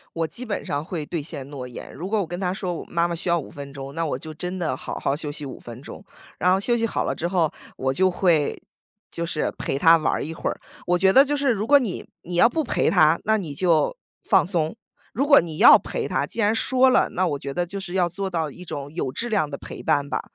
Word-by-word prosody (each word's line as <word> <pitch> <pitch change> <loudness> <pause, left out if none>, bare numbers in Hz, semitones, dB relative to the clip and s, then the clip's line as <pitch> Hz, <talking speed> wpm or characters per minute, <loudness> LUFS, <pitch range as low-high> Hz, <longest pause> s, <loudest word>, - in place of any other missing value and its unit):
我 165 -1 0
基 240 - -5
本 220 -4 -3
上 145 +1 -2
会 160 -2 -4
兑 165 +2 -3
现 140 -2 -6
诺 135 -3 -6
言， 125 - -9
如 175 +6 -6
果 215 +1 +1
我 190 - -2
跟 175 +2 -5
她 180 -1 -1
说： 185 -3 -4
“妈 170 0 +1
妈 170 - -2
需 170 - -4
要 170 - +3
5 - - -8
分 140 -1 -9
钟”， 135 0 -7
那 165 - 0
我 145 - -2
就 155 +3 -9
真 180 +4 -5
的 155 -6 -1
好 - - -6
好 140 - 0
休 150 -1 -5
息 145 0 -6
5 135 - -7
分 120 +1 -10
钟， 190 - -10 0.3
然 180 - +3
后 190 - +2
休 240 +3 +1
息 230 -1 +1
好 - - -1
了 - - -1
之 170 - -2
后， 175 -4 +1 0.2
我 130 0 0
就 185 +6 +3
会， 175 -5 +1 0.5
就 170 - -4
是， 160 -2 -1
陪 - - -2
她 165 +4 +6
玩 155 -4 0
一 160 - -5
会 165 - -3
儿。 - - -5 0.3
我 180 0 +3
觉 190 +1 +4
得 270 +5 +8
就 290 +1 -1
是 280 -2 +1
如 215 -2 0
果 285 +2 +6
你 225 -8 -4
你 175 0 -5
要 230 - +6
不 315 +6 -1
陪 - - 0
她， - - +4
那 220 - +3
你 160 -8 -5
就 170 - +2 0.3
放 - - +3
松， 170 0 -1 0.4
如 275 +6 0
果 285 -1 +8
你 165 -2 -6
要 - - +10
陪 - - -3
她， - - 0
既 - - -9
然 215 -1 +3
说 260 +3 +3
了， - - +3
那 185 +1 0
我 150 -4 -1
觉 140 0 -6
得 175 +5 -1
就 195 +3 -6
是 185 -2 -6
要 180 -2 +2
做 190 +3 -4
到 160 -4 -2
一 180 - -11
种 145 -4 -6
有 160 -5 -2
质 235 - -4
量 200 -10 0
的 140 - -5
陪 - - -9
伴 145 -3 +1
吧。 - - -1
175 Hz, 285 characters per minute, -23 LUFS, 150-195 Hz, 0.5 s, 要